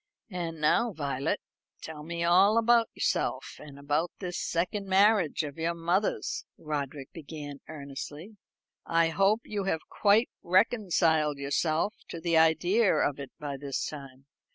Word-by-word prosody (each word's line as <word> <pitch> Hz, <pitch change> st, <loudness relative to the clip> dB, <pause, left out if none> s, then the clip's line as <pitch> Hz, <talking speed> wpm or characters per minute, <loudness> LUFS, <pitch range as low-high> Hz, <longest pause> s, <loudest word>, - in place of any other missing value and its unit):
"And 170 Hz, -3 st, -4 dB
now, 205 Hz, +9 st, +2 dB
Violet, 140 Hz, -2 st, -2 dB, 0.4 s
tell 160 Hz, -2 st, -7 dB
me 170 Hz, +2 st, -4 dB
all 190 Hz, +6 st, +5 dB
about 230 Hz, 0 st, +4 dB
yourself, -, -, -1 dB
and 145 Hz, -2 st, -11 dB
about 145 Hz, +4 st, 0 dB
this 180 Hz, -2 st, -4 dB
second 185 Hz, +4 st, -2 dB
marriage 195 Hz, -4 st, +3 dB
of 145 Hz, +1 st, -7 dB
your 170 Hz, +1 st, -1 dB
mother's," 175 Hz, +5 st, -1 dB
Roderick 145 Hz, -3 st, -5 dB
began 145 Hz, -3 st, -8 dB
earnestly; 150 Hz, +6 st, -8 dB, 0.5 s
"I 165 Hz, 0 st, +2 dB
hope 195 Hz, +6 st, +2 dB
you 205 Hz, -2 st, -3 dB
have 160 Hz, -4 st, -2 dB
quite 210 Hz, +3 st, +3 dB
reconciled 175 Hz, -6 st, +2 dB
yourself 155 Hz, +7 st, 0 dB, 0.2 s
to 170 Hz, -, -6 dB
the 170 Hz, 0 st, 0 dB
idea 175 Hz, +7 st, +4 dB
of 145 Hz, -1 st, 0 dB
it 140 Hz, -, -6 dB
by 145 Hz, -2 st, -5 dB
this 140 Hz, 0 st, -3 dB
time." 135 Hz, -3 st, -9 dB
165 Hz, 140 wpm, -29 LUFS, 145-195 Hz, 0.5 s, all